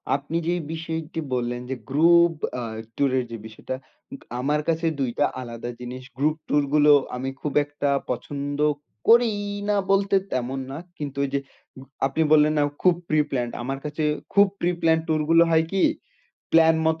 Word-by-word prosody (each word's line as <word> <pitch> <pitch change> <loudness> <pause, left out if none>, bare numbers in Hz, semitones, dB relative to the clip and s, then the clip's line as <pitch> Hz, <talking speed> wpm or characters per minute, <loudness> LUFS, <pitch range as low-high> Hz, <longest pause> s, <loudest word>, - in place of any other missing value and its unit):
আপনি 145 +4 -3
যেই 175 0 0
বিষয়টি 160 0 -4
বললেন 120 0 -2
যে, 130 - -2
গ্রুপ 170 +4 +5 0.3
আ - - -4 0.3
ট্যুরের 130 -2 +1
যে 115 - -5
বিষয়টা 110 +4 -6 0.4
উগ - - -9 0.2
আমার 145 +4 +1
কাছে 165 0 0
২ 130 -3 0
টা 145 - +5 0.2
আলাদা 120 -1 -6
জিনিস, 125 +1 -7
গ্রুপ 150 +3 +2
ট্যুর 145 0 +2
গুলো 150 0 +6 0.2
আমি 130 +2 -3
খুব 150 - -3
একটা 145 0 -2 0.2
পছন্দ 140 +3 -4 0.5
করিই 225 -3 +4 0.2
না 210 - +3 0.2
বলতে 195 0 +3 0.2
তেমন 130 +1 -2
না। 140 - -5 0.2
কিন্তু 145 -2 -6
ওইযে 140 0 -1 0.4
গ - - -10 0.3
আপনি 140 +4 -2
বললেন 155 0 +5
না - - +4 0.2
খুব 180 -2 +5
প্রি 155 0 +3
প্ল্যান্ড, 120 -3 -2
আমার 135 +2 -3
কাছে 150 +1 -3 0.3
খুব 200 0 +6
প্রি 175 - +1
প্ল্যান্ড 160 0 +3
ট্যুর 155 -1 +1
গুলো 165 0 +7
হয় 160 0 +4
কি? 195 -1 +1 0.7
প্ল্যান 160 0 +6
মত 160 0 +1
150 Hz, 175 wpm, -24 LUFS, 135-165 Hz, 0.7 s, গুলো